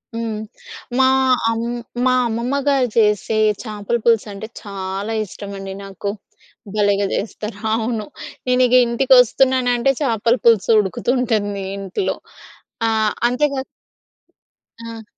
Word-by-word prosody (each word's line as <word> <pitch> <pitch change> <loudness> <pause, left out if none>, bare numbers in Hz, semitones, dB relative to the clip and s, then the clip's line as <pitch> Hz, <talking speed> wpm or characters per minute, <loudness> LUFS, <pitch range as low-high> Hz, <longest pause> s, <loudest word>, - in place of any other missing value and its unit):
హ్మ్. 225 -2 -3 0.6
మా 265 - +5 0.4
అమ్ 230 0 -1 0.4
మా 255 - +4
అమ్మమ్మ 235 +4 -1
గారు 265 -4 +3
చేసే 215 0 +2 0.2
చేపల 215 0 -3
పులుసంటే 220 -2 +1
చాలా 195 +1 -4
ఇష్టమండి 195 -1 -8
నాకు. 195 +1 -5 0.7
భలేగా 205 -1 +2
చేస్తారు. 210 0 -4 0.2
అవును. 225 -1 -1 0.4
నేను 250 0 +3
ఇగ 250 - +3
ఇంటికొస్తున్ననంటే 250 0 +3
చేపల 230 -2 +2
పులుసు 225 -4 +4
ఉడుకుతుంటుంది 215 -2 -1
ఇంట్లో. 195 - -2 0.7
ఆ! - - +2 0.4
అంతేగా 275 +1 0 1.2
ఆ! 230 -1 -8
225 Hz, 100 wpm, -20 LUFS, 205-250 Hz, 1.2 s, మా